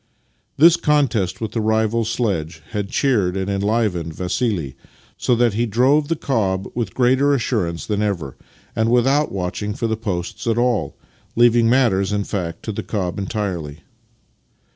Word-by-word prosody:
This 170 +3 +7
contest 135 - +1
with 110 - -4
the 115 - -2
rival 110 +1 +1
sledge 85 -9 -2
had 105 -2 -3
cheered 105 -9 +1
and 95 +1 -2
enlivened 100 -5 -1
Vassili, 90 - -2 0.4
so 125 - +1
that 120 -2 +2
he 120 +3 0
drove 130 +7 +3
the 165 - 0
cob 100 -10 -1
with 115 -6 -3
greater 130 +3 +3
assurance 105 -10 -2
than 105 -1 -1
ever, 90 -10 -2 0.4
and 110 0 +1
without 135 +5 +2
watching 100 +2 -3
for 115 - -3
the 110 -1 0
posts 100 0 -4
at 115 0 +1
all 120 -2 0 0.2
— - - -35
leaving 120 -1 +4
matters, 110 -7 +2
in 105 -1 0
fact, 85 -5 -4
to 110 - -3
the 100 - -4
cob 95 -3 -3
entirely. 90 -7 -4
110 Hz, 160 wpm, -20 LUFS, 95-120 Hz, 0.4 s, This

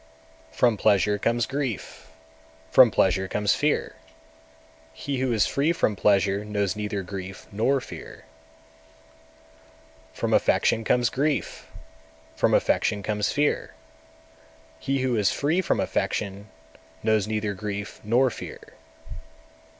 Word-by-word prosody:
212. - - -20
From 120 -4 +3
pleasure 105 -1 +3
comes 115 +2 +1
grief, 135 -5 -4 0.6
from 130 -2 +8
pleasure 95 -1 +1
comes 105 +1 +1
fear; 150 0 -1 1.0
he 135 - -4
who 130 -1 0
is 110 -2 +3
free 145 +4 +1
from 110 -10 0
pleasure 100 0 +2
knows 105 -2 -1
neither 105 -2 -3
grief 95 0 -8
nor 115 +7 +1
fear. - - -11 1.9
213. - - -14
From - - 0
affection 115 - +2
comes 120 +1 +2
grief, 145 +2 -2 0.7
from - - +2
affection 100 -1 +1
comes 105 0 -1
fear; 150 0 -1 1.0
he 135 - -1
who 130 -2 +1
is 105 -3 +2
free 160 +6 +1
from - - 0
affection 100 +1 -2 0.5
knows 110 -2 +2
neither 105 -1 -2
grief 100 0 -6
nor 125 +4 +3
fear. - - -8
105 Hz, 120 wpm, -25 LUFS, 100-130 Hz, 1.9 s, from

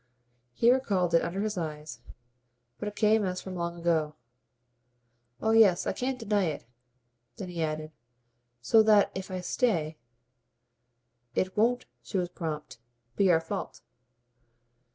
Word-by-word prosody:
He 235 - +5
recalled 195 -10 +1
it, 165 - +5
under 190 +4 -3
her 205 -4 -3
eyes, 150 -5 -6 0.8
but 210 - -4
it 210 - -6
came 215 0 +3
as 185 -1 -2
from 190 - -7
long 170 0 -3
ago. 160 -3 0 1.2
"Oh 220 - +1
yes. 215 -6 +5
I - - 0
can't 260 +1 -2
deny 210 -4 0
it." 155 - -4 0.7
Then 195 -5 -6
he 170 -2 -4
added: 155 0 -3 0.7
"So 220 - +6
that 215 -2 +4
if 190 +1 -6
I 185 -1 -4
stay 170 -7 0 0.7
" 120 0 -45
"It 185 0 -1
won't" 240 +4 +2 0.2
she 200 - -4
was 180 -1 -1
prompt 155 -7 -6 0.4
"be 195 -2 +3
our 165 - +4
fault." 165 - -6
180 Hz, 145 wpm, -28 LUFS, 155-210 Hz, 1.2 s, So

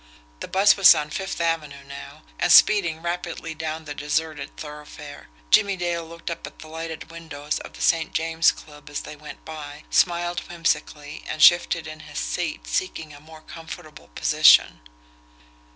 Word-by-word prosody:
The - - -6
bus 195 +2 +4
was 195 -2 +8
on 150 0 -3
Fifth 195 +1 -4
Avenue 155 -4 -2
now, 140 +2 -11 0.2
and - - +2
speeding 170 -5 +5
rapidly 170 -1 -4
down 160 0 -5
the 145 - -6
deserted 150 +2 -3
thoroughfare. 150 -1 -10 0.2
Jimmie 200 -1 +4
Dale 175 -1 -2
looked 170 +1 -8
up 165 - -6
at - - -14
the 155 - -12
lighted 160 0 -7
windows 155 -3 -5
of - - -11
the - - -6
St. 160 -1 +2
James 165 0 +2
Club 150 -1 -14
as 145 - -4
they 150 - -9
went 150 0 -12
by, 150 -1 -9
smiled 175 0 +2
whimsically, 155 -3 -2
and - - -5
shifted 175 -1 +5
in 155 0 -9
his 155 - -10
seat, - - -3
seeking 155 - -3
a 145 - -13
more 155 +1 -15
comfortable 160 0 -11
position. - - +5
160 Hz, 165 wpm, -24 LUFS, 150-170 Hz, 0.2 s, was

